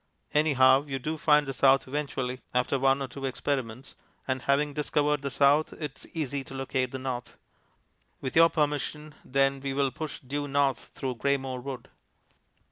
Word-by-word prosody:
Anyhow 140 -2 +5
you 135 -1 -2
do 155 +5 -3
find 150 -1 +4
the 135 - -4
south 135 +2 +4
eventually 130 -3 -3
after 125 +2 +1
one 135 +1 +3
or - - -4
two 135 +3 -9
experiments, 130 -1 -3 0.3
and 130 -1 -1
having 140 +3 +1
discovered 150 0 +1
the 140 - -2
south 145 +3 +3
it 150 -3 -5
is - - -13
easy 145 -3 -2
enough 135 - -9
to - - -9
locate 130 -1 -1
the 135 - -4
north. 125 -3 -5 0.8
With 130 - -5
your 165 +1 +7
permission 150 0 -2
then 135 +1 +1
we 135 0 -3
will 140 -1 +1
push 155 +1 -6
due 145 +2 -3
north 140 -1 +1
through 130 -3 -5
Greymoor 135 -1 -1
Wood. 130 -2 -7
135 Hz, 175 wpm, -28 LUFS, 130-145 Hz, 0.8 s, your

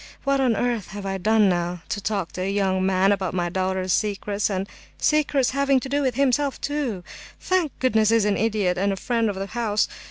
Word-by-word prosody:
What 275 0 +1
on 250 -4 +2
earth 235 -3 -1
have 200 +1 -8
I 195 0 -2
done 215 +2 +3
now? 175 -1 -1
To 205 - -3
talk 195 -4 -2
to 185 - -6
a 190 - -1
young 190 -2 +1
man 190 +1 +3
about 190 -3 -1
my 175 -1 0
daughter's 185 0 -1
secrets—and 200 -1 -1 0.3
secrets 290 -4 +2
having 275 0 +2
to 265 - -7
do 285 +1 +1
with 260 -3 0
himself, 275 +1 +1
too! 275 -10 -3 0.4
Thank 365 -6 0
goodness, 220 -4 +2
he's 225 -2 +3
an 205 -1 +2
idiot, 205 -5 0
and 200 +1 +1
a - - -1
friend 230 +3 0
of 200 - -3
the 195 +1 -3
house! 215 -1 0
210 Hz, 210 wpm, -23 LUFS, 190-255 Hz, 0.4 s, done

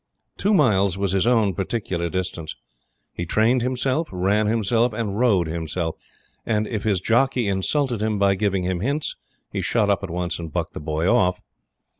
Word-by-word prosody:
Two 205 +1 +2
miles 100 - +3
was 100 -1 0
his 95 +3 +1
own 110 -5 +3
particular 90 -2 -2
distance. 90 -3 -4 0.6
He 85 - -5
trained 115 +7 +3
himself, 130 +5 0
ran 100 +3 +1
himself, 115 +2 +1
and 105 -3 -3
rode 105 -8 +3
himself; 80 +1 -3 0.5
and, 110 -1 0
if 110 -2 -3
his 100 -4 +2
jockey 120 +2 +2
insulted 115 +5 0
him 110 -1 0
by 100 -1 +3
giving 95 -1 0
him 90 -1 -1
hints, 140 - -2 0.4
he - - -2
shut 105 -3 +2
up 100 - +1
at 100 - -4
once 85 0 -3
and 80 -2 -6
bucked - - -3
the - - -6
boy 80 +2 -1
off. 90 -1 +3
100 Hz, 175 wpm, -23 LUFS, 90-115 Hz, 0.6 s, miles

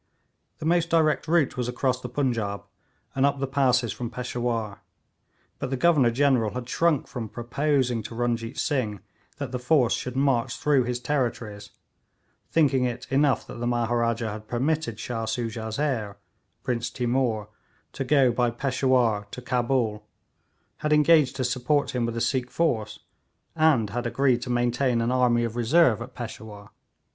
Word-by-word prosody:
The - - -7
most 170 0 +2
direct 160 -2 +2
route 165 -4 +2
was 125 -1 -2
across 125 +1 -1
the 125 - -6
Punjaub, 115 -7 -1 0.5
and 135 -1 0
up 140 0 +2
the 135 - 0
passes 130 -4 +1
from 120 -2 -5
Peshawur, 120 -4 -3 0.8
but - - -3
the 135 - -2
Governor 145 -5 +4
General 125 -3 +2
had 125 -1 -5
shrunk 165 0 +1
from 115 -3 -6
proposing 125 +1 0
to 115 - -8
Runjeet 120 +1 -2
Singh 110 - -1 0.4
that 140 -4 -5
the 125 - -3
force 125 -1 +3
should 125 0 -4
march 135 -3 +1
through 140 -4 +2
his 125 0 -2
territories, 120 -6 -3 0.8
thinking 135 -5 +3
it 125 -1 -3
enough 140 -2 +2
that - - -9
the 120 - -2
Maharaja 115 -1 0
had 105 +1 -8
permitted 125 -2 -1
Shah 115 0 -3
Soojah's 110 -1 -3
heir, 120 -9 -2 0.5
Prince 120 -2 -1
Timour, 120 -4 -1 0.4
to - - -3
go 135 -1 +4
by 120 0 +1
Peshawur 125 -4 +1
to - - -8
Cabul, 120 -3 0 0.7
had 150 0 -2
engaged 150 -3 +5
to 135 - -2
support 130 +4 0
him 120 -2 -1
with 115 0 -4
a - - -1
Sikh 125 +1 0
force, 110 -11 -1 0.5
and 150 -10 +3
had 120 +2 -2
agreed 130 -1 +2
to 125 - -6
maintain 120 +1 +1
an 115 +1 0
army 125 -2 +3
of 115 -1 -3
reserve 120 0 +3
at 125 +2 -8
Peshawur. 110 -3 -8
125 Hz, 160 wpm, -25 LUFS, 115-135 Hz, 0.8 s, engaged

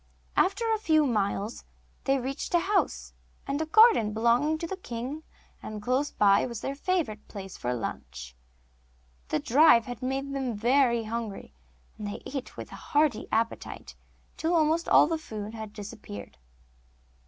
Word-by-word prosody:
After 395 +5 +2
a 435 - 0
few 315 -7 +3
miles 210 -2 -1 0.4
they 270 0 +3
reached 270 +6 -3
a - - +6
house 390 +2 0 0.3
and 305 +3 -2
garden 435 - +6
belonging 235 +8 +2
to 335 - -4
the 385 - -4
king, 255 -2 -6 0.4
and 215 -1 -6
close 255 +7 0
by 200 -1 +4
was 235 -2 -6
their 275 - -3
favourite 290 - -2
place 195 -2 -8
for 120 - -3
lunch. 65 - -6 0.9
The - - 0
drive 240 - +5
had 245 -2 -7
made 270 +2 -2
them 260 -4 -2
very 235 +1 +3
hungry, 220 - -5 0.5
and 210 - -4
they 205 - -6
ate 270 -2 -6
with - - -8
a - - -8
hearty 290 -6 +1
appetite, 225 +1 -2 0.4
till 330 +2 +1
almost 320 +1 +2
all - - +7
the 320 +1 -1
food 215 -7 -7
had 220 -2 -7
disappeared. 205 - -9
250 Hz, 155 wpm, -28 LUFS, 215-310 Hz, 0.9 s, all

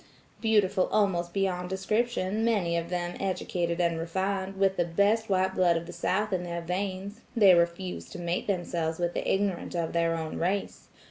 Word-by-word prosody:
Beautiful 205 -4 +3
almost 175 -5 +1
beyond 180 -2 -1
description, 210 +1 0
many 200 -7 +1
of 170 0 -2
them 175 -1 -2
educated 180 -3 -1
and 170 -2 +1
refined, 190 +3 -2
with 195 0 +3
the 175 - +2
best 200 +6 +1
white 190 0 +2
blood 175 -3 +3
of 165 - -4
the - - -9
South 210 +2 0
in 185 - +1
their 170 -1 -4
veins, 190 +4 -4
they 200 -5 +7
refuse 170 +2 0
to - - -8
mate 175 0 -2
themselves 170 -4 -1
with 175 0 -1
the - - -1
ignorant 195 -3 -1
of 170 -1 -1
their 165 -1 +2
own 160 -1 -4
race. 195 +4 -2
185 Hz, 180 wpm, -28 LUFS, 170-195 Hz, -, they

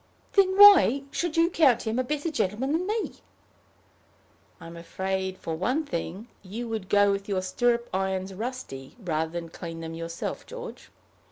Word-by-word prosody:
"Then 380 -1 +4
why 385 - +8
should 345 -2 -2
you 330 0 +5
count 265 -9 +3
him 225 +3 -1
a - - +2
better 300 +5 -2
gentleman 230 +1 -1
than 340 +4 0
me?" 435 +1 -2 1.4
"I'm 165 +1 -10
afraid 190 +3 -3
for 165 - -4
one 255 - -1
thing, 190 - -5
you 215 +5 -6
would 215 -4 -4
go 205 0 +4
with 200 +1 -3
your 190 -2 0
stirrup 235 +5 +1
irons 190 0 -2
rusty, 190 - -6
rather 160 -7 -2
than 170 -1 -5
clean 165 0 -8
them 165 0 -6
yourself, 165 0 -5
George. 485 -1 -9
205 Hz, 160 wpm, -26 LUFS, 185-280 Hz, 1.4 s, why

